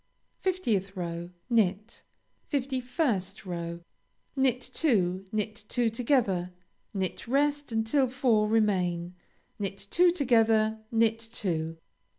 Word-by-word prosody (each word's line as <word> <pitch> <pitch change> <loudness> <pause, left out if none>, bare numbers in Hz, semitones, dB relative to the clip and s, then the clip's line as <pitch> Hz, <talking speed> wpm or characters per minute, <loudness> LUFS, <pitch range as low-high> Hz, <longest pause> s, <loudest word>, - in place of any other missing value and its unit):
50th 225 - 0
row 170 -1 -4 0.2
Knit. 215 -2 +1 0.5
51st 255 - -1
row 170 -1 -4 0.5
Knit 265 -2 +2
two; 195 - 0
knit 215 -1 -3
two 240 -2 +1
together; 225 -7 +1 0.4
knit 190 +2 -3
rest 290 +2 +1
until 225 +5 +2
four 240 -4 +2
remain; 180 -5 +1 0.5
knit 195 -1 -4
two 355 +1 +5
together; 225 -8 +3
knit 225 -1 +3
two. 165 -8 -3
220 Hz, 100 wpm, -29 LUFS, 190-250 Hz, 0.5 s, two